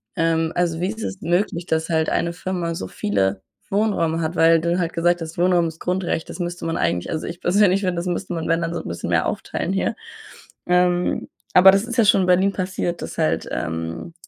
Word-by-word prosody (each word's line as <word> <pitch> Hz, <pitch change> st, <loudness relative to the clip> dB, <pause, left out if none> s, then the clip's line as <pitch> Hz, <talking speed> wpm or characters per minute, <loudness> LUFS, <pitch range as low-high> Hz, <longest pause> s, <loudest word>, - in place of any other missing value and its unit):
Ähm, 165 Hz, 0 st, +1 dB
also, 170 Hz, -2 st, 0 dB
wie 185 Hz, -, +1 dB
ist 220 Hz, 0 st, -6 dB
es 190 Hz, -, -5 dB
möglich, 175 Hz, 0 st, 0 dB
dass 160 Hz, -1 st, -1 dB
halt 160 Hz, -1 st, +1 dB
eine 170 Hz, 0 st, 0 dB
Firma 175 Hz, -2 st, -3 dB
so 95 Hz, -, -5 dB
viele 95 Hz, -1 st, -1 dB, 0.3 s
Wohnräume 180 Hz, -6 st, +1 dB
hat, 160 Hz, +2 st, -2 dB
weil 165 Hz, 0 st, +5 dB
du 170 Hz, +1 st, 0 dB
halt 170 Hz, -1 st, -1 dB
gesagt 175 Hz, +1 st, +1 dB
hast: 160 Hz, +1 st, -7 dB
„Wohnraum 175 Hz, -1 st, +3 dB
ist 160 Hz, 0 st, -8 dB
Grundrecht“, 180 Hz, -2 st, -2 dB
das -, -, -8 dB
müsste 175 Hz, -1 st, -4 dB
man 165 Hz, 0 st, -1 dB
eigentlich 90 Hz, 0 st, -1 dB
also, 160 Hz, -, -3 dB
ich 170 Hz, +1 st, -6 dB
persönlich 195 Hz, +1 st, +3 dB
finde, 180 Hz, -2 st, -1 dB
das 170 Hz, +1 st, -3 dB
müsste 180 Hz, +1 st, -3 dB
man, 165 Hz, -1 st, -3 dB
wenn 165 Hz, +1 st, +2 dB
dann 165 Hz, 0 st, -2 dB
so 170 Hz, -, -3 dB
'n -, -, -10 dB
bisschen 85 Hz, -, -5 dB
mehr -, -, +2 dB
aufteilen 190 Hz, -, -3 dB
hier. 195 Hz, -, 0 dB, 0.7 s
Ähm, 180 Hz, 0 st, +1 dB, 0.2 s
aber 190 Hz, +1 st, +9 dB
das 195 Hz, +2 st, +2 dB
ist 240 Hz, -1 st, -5 dB
ja 230 Hz, -, +5 dB
schon 195 Hz, -, +5 dB
in 185 Hz, -, 0 dB
Berlin 185 Hz, +2 st, +4 dB
passiert, 185 Hz, -2 st, -3 dB
dass -, -, -7 dB
halt, 80 Hz, +1 st, 0 dB
ähm, 80 Hz, -, -4 dB
170 Hz, 225 wpm, -22 LUFS, 165-185 Hz, 0.7 s, aber